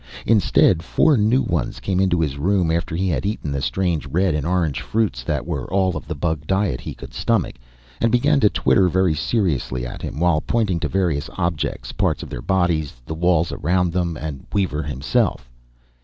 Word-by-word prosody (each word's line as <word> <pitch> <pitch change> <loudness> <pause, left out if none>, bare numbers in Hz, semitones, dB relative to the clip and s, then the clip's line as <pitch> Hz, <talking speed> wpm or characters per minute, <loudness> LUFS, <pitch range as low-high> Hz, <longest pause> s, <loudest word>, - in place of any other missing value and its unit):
Instead, 100 -5 +4
four 145 - +3
new 115 +4 +3
ones 85 - -2
came 95 -2 -1
into 95 -3 +2
his 70 -3 -2
room 90 0 +2
after 85 0 -1
he 95 +3 0
had 80 -6 0
eaten 100 -7 -3
the 70 -1 -2
strange 85 -2 -1
red 90 +5 +1
and 75 +1 -1
orange 85 -5 0
fruits 105 - -1
that - - -2
were - - -4
all 95 -2 +1
of 75 - -6
the 80 - -4
bug 75 0 -2
diet 95 -9 0
he - - -7
could - - -11
stomach, - - 0 0.4
and 115 - +2
began 115 - +3
to - - +5
twitter 95 -2 +3
very 95 -1 +2
seriously 75 - -1
at - - -7
him, - - -5
while 85 -2 +2
pointing 105 -7 0
to - - -1
various 85 -6 -1
objects, 85 -4 -2
parts - - 0
of - - -10
their - - -5
bodies, 85 -2 0
the 80 - -5
walls 85 0 +2
around 90 -1 0
them, 85 -3 -1
and 75 -4 -6
Weaver 95 -7 0
himself. 65 -4 -1
85 Hz, 195 wpm, -21 LUFS, 75-95 Hz, 0.4 s, to